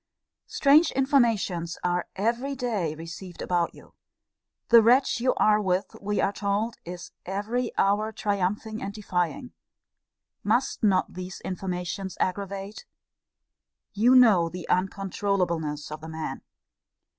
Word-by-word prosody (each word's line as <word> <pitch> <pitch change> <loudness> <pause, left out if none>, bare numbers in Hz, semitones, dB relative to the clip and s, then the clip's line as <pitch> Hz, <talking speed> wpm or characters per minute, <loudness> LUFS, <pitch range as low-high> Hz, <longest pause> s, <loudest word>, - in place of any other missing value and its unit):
Strange 300 +4 +5
informations 225 - +1
are 175 0 0
every 235 +7 -1
day 215 - -2
received 165 +3 -9
about 175 -1 0
you. - - -17 0.8
The 235 -1 +8
wretch 245 +3 +4
you 255 +2 +1
are 215 0 +4
with, 185 -1 -1
we 205 +1 -1
are 200 - +1
told, 205 +3 -1
is 175 0 -8
every 220 +6 -2
hour 210 +2 +2
triumphing 210 +1 -2
and 195 - -4
defying 210 - -2 0.9
Must - - +1
not 195 -4 +2
these 185 +1 -7
informations 185 +1 -4
aggravate? 200 - -3 1.1
You 235 +5 +4
know 210 -10 +6
the 180 0 -7
uncontroulableness 180 -5 -1
of 155 0 -6
the 160 - -8
man. 160 0 -5
200 Hz, 120 wpm, -26 LUFS, 180-225 Hz, 1.1 s, The